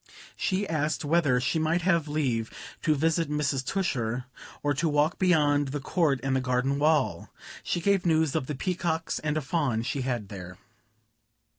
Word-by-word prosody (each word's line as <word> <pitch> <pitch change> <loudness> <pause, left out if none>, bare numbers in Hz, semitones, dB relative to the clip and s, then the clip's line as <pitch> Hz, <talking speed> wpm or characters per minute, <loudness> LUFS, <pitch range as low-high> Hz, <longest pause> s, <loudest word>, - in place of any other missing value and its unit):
She 195 +1 -1
asked 155 -2 -1
whether 145 -5 +3
she 140 +6 0
might 160 +3 +1
have 170 -4 +2
leave 130 -7 -1 0.3
to 155 - +2
visit 165 +2 +1
Mrs. 145 -3 0
Tusher, 125 -8 -1 0.4
or 145 0 +2
to 160 +4 0
walk 150 +2 +1
beyond 150 -6 +3
the 145 +2 -3
court 145 -2 +1
and 135 0 0
the 130 - +1
garden 130 +2 0
wall. 150 -2 +1 0.3
She - - -1
gave 195 0 +2
news 160 -3 +2
of 145 -5 -1
the 150 - -3
peacocks, 170 0 -2
and 150 0 -1
a - - 0
fawn 135 -6 0
she 135 +3 -2
had 120 -6 -3
there. 90 -3 -8
150 Hz, 170 wpm, -27 LUFS, 130-165 Hz, 0.4 s, whether